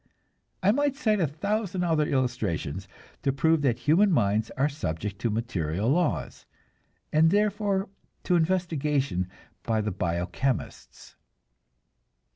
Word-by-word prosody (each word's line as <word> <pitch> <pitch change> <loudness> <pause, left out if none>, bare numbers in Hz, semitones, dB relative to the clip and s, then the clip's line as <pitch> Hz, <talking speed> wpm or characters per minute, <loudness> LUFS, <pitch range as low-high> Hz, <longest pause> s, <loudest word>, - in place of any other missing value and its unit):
I 195 - +5
might 285 +3 +1
cite 215 -7 +1
a 170 - +2
thousand 195 +4 -2
other 160 -3 +2
illustrations 100 - -1 0.3
to 135 - +1
prove 160 +3 +2
that 125 -5 +2
human 185 +7 +3
minds 110 - +2
are 135 +2 +3
subject 100 - -4
to 120 - 0
material 105 -3 -1
laws, 175 +5 -1 0.7
and 160 +1 +5
therefore 205 0 +1 0.4
to 180 - +2
investigation 150 - 0 0.3
by 110 -1 0
the 105 0 -1
bio 85 -1 -1
chemists. 130 +6 -4
145 Hz, 120 wpm, -27 LUFS, 110-180 Hz, 0.7 s, I